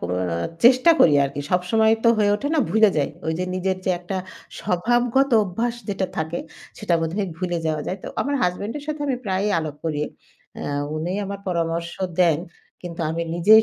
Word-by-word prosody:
ক - - -30 0.3
আ - - -1 0.3
চেষ্টা 255 +6 +7
করি 150 - +7
আরকি। 140 +1 -4
সব 180 -1 +3
সময় 220 0 +4
তো - - +7
হয়ে 205 -1 +3
ওঠে 285 +6 -3
না, - - +2
ভুলে 215 0 +5
যাই। 145 0 +1 0.2
ওই 160 - +1
যে 180 - 0
নিজের 185 0 0
যে 185 - +1
একটা 185 +2 -4 0.4
স্বভাবগত 240 +8 +2
অভ্যাস 225 +6 -2
যেটা 195 -2 -1
থাকে 160 +2 -2 0.4
সেটা 195 -5 +1
মধ্যে 165 +6 -2 0.2
ভুলে 175 -1 -1
যাওয়া 155 -1 -1
যায়। 190 - -3
তো - - -8
আমার 285 +1 0
husband 200 +7 -1
এর - - -10
সাথে 305 -1 -4
আমি 260 -3 0
প্রায়ই 195 +1 0
আলাপ 155 -2 -4
করি। 150 -2 -1 0.6
আ - - -5 0.3
উনি 170 +4 -2
আমার 200 0 -5
পরামর্শ 170 0 -1 0.3
দেন 165 -4 +4 0.4
কিন্তু 170 -1 -6
আমি 165 +1 -2
নিজেই 215 +6 +7
185 Hz, 195 wpm, -23 LUFS, 170-220 Hz, 0.6 s, চেষ্টা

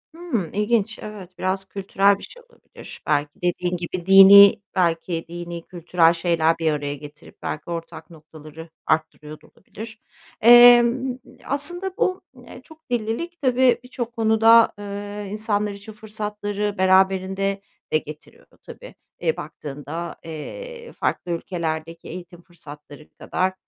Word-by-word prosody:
Hımm, 285 - -4
ilginç. 210 +1 0
Evet, 195 -4 -10
biraz 190 +1 -2
kültürel 195 +1 +1
bir - - -14
şey - - -12
olabilir. 475 - -14
Belki 145 0 +1
dediğin 180 0 -1
gibi 175 0 -6
dinî 195 +1 +8
belki 170 -2 -1
dinî, 170 0 -7
kültürel 170 -1 +2
şeyler 165 -1 +1
bir 165 -1 0
araya 145 -1 -3
getirip 145 +1 -14
belki 155 +2 -5
ortak 165 -1 -7
noktaları 155 0 -13 0.2
arttırıyor 155 -1 -2
da - - -20
olabilir. 225 +3 -12 0.4
Emm, 240 +2 +6 0.3
aslında 350 +7 -1
bu, 370 0 0
eee, 245 0 -13
çok 320 0 -19
dillilik 245 +9 -3
tabii 255 -2 +3
birçok 240 -2 -6
konuda, 225 0 +4
eee, 205 0 -7
insanlar 210 -1 -1
için 200 +2 -11
fırsatları 210 -1 -4
beraberinde 190 +1 +2 0.3
de - - +5
getiriyor 150 0 -11 0.2
tabii. - - -12 0.3
E, 480 - 0
baktığında, 150 +4 -7
eee, 475 - -8
farklı 175 - -3
ülkelerdeki 165 -1 -4
eğitim 175 0 -10
fırsatları 150 -4 -14
kadar 185 +1 -2
195 Hz, 125 wpm, -22 LUFS, 165-225 Hz, 0.4 s, dinî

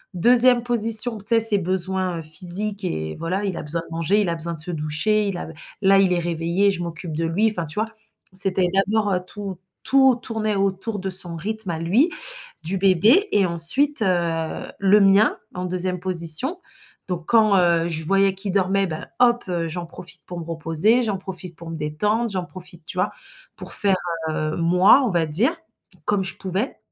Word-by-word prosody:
2e 240 +5 +6
position, 230 -1 +5
tu 200 - -14
sais? 230 -1 +4
Ses 220 -2 +5
besoins, 185 0 0
heu, - - -6
physiques 185 +6 -2
et 80 - -4
voilà, 185 +5 -3
il 190 -3 -3
a - - -4
besoin 160 +2 -5
de 165 - -11
manger, 165 +5 +1
il 195 - -1
a 170 - -2
besoin 170 +1 -5
de - - -11
se 175 +3 -5
doucher, 165 +7 -1
il 195 -3 -3
a - - -7 0.4
là, 195 0 +5
il 190 -2 +2
est 180 - +1
réveillé, 170 +4 0
je 175 - -5
m'occupe 170 -1 -6
de 165 +2 -2
lui, 200 +7 +1
enfin, 175 -5 -3
tu 150 - -7
vois? 215 - +1 0.5
C'était 190 -1 +2
d'abord, 205 +1 +1
heu, 180 - -1
tout 200 -3 -8 0.2
tout 265 -1 +4
tournait 225 -3 -3
autour 195 +2 -2
de 190 - -4
son 185 -2 +1
rythme 205 +2 -3
à 160 - -4
lui, 220 - +1 0.5
du 180 +4 -3
bébé 200 - +3
et 200 -2 +2
ensuite, 220 - +3
heu, 170 -4 -2
le 200 +2 +4
mien 195 +3 +4 0.2
en 180 - -4
2e 180 0 -3
position, 180 - +2 0.5
donc 175 -3 -5
quand, 215 -4 +4
heu, 170 -1 +2
je 160 -1 -4
voyais 195 +1 +2
qu'il 195 +1 -5
dormait, 195 0 +1
ben, 155 -1 -7
hop, 240 -1 +3
heu, 170 -2 -2
j'en 170 +1 -6
profite 175 +1 -9
pour 175 -1 -7
me 165 - -8
reposer, 165 +8 0
j'en 210 -4 -2
profite 185 -2 -7
pour 165 0 -10
me 165 - -6
détendre, 210 +10 -1
j'en 185 -3 -3
profite 175 -2 -10
tu - - -8
vois? - - 0 0.4
Pour - - -2
faire, 200 -2 +4 0.3
heu, 155 0 -3
moi, 180 +9 +4
on 250 - 0
va 170 -4 0
dire 210 - 0 0.5
comme 205 -2 0
je 190 - -4
pouvais 195 +7 -4
185 Hz, 200 wpm, -21 LUFS, 170-210 Hz, 0.5 s, 2e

